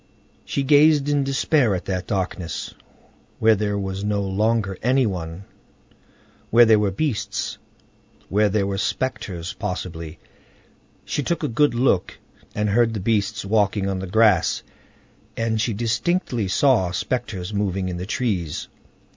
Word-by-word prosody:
She 140 - -1
gazed 145 +1 +5
in 145 -1 +2
despair 135 -4 +2
at 90 - -5
that 90 -1 -3
darkness, 95 -3 -3 0.6
where 110 0 +5
there 105 -1 -1
was 95 0 -4
no 105 -1 0
longer 100 0 0
any 130 +2 +3
one, 90 -3 -4 1.1
where 120 +1 +7
there 110 -1 +5
were 105 -1 +1
beasts, 105 -2 -2 0.7
where 105 +2 +2
there 100 0 +1
were 100 0 -2
spectres, 100 -7 -3
possibly. 85 -3 -5 0.9
She - - -2
took 165 +3 -2
a - - +1
good 145 +2 +2
look, 120 -7 +1 0.4
and 105 0 0
heard 115 +2 +2
the - - -2
beasts 105 0 0
walking 100 -1 +1
on 95 -1 -2
the 95 - -5
grass, 105 -3 +3 0.7
and 115 -1 0
she 115 - 0
distinctly 120 - -1
saw 110 -2 +3
spectres 105 -1 -3
moving 95 -2 -1
in 90 -1 -4
the 90 +2 -5
trees. 95 - -2
105 Hz, 140 wpm, -22 LUFS, 95-120 Hz, 1.1 s, where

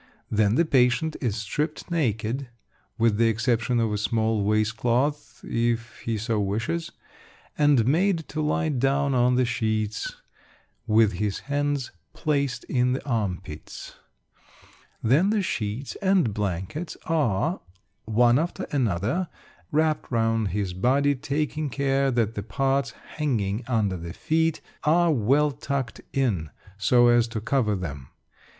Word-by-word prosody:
Then 105 0 +3
the 170 - +3
patient 130 +2 +2
is 120 -7 0
stripped 145 - -3
naked 125 -4 -1 0.5
(with 115 -2 +2
the 115 +1 +4
exception 120 +1 +1
of 110 -2 +1
a 105 - -1
small 110 -1 +1
waist 110 +1 +1
cloth, 135 +6 -1
if 115 0 -1
he 115 -1 -2
so 110 +1 -1
wishes), 110 +12 -2 0.6
and 145 -6 +4
made 165 +4 +2
to 155 - -3
lie 155 +2 0
down 140 +1 +1
on 125 0 +3
the 125 0 +3
sheets, 110 -3 -2 0.7
with 110 -1 +4
his 100 +1 -2
hands 145 -1 -1 0.2
placed 140 -5 -1
in 125 -1 +1
the 130 - -4
arm 105 -9 -1
pits. 75 -5 -9 1.1
Then 145 - +4
the 210 -2 +1
sheets 115 - -3
and 190 - +2
blankets 100 - -3
are, 155 - 0 0.4
one 120 +3 +4
after 170 +2 -3
another, 125 - 0 0.4
wrapped 155 0 +1
round 115 -2 +1
his 95 -1 -2
body, 135 +9 +2
taking 150 +2 -2
care 135 +1 +1
that 115 -3 +1
the 105 - -4
parts 135 +6 -1 0.2
hanging 115 -7 -1
under 105 -6 0
the 85 0 -7
feet 160 0 0 0.2
are 170 +2 +4
well 140 +5 +3
tucked 135 -4 -4
in 105 - 0 0.3
so 120 +5 +4
as 120 -1 +4
to 115 -1 -4
cover 110 -1 +1
them. 70 -8 -6
120 Hz, 135 wpm, -25 LUFS, 110-145 Hz, 1.1 s, the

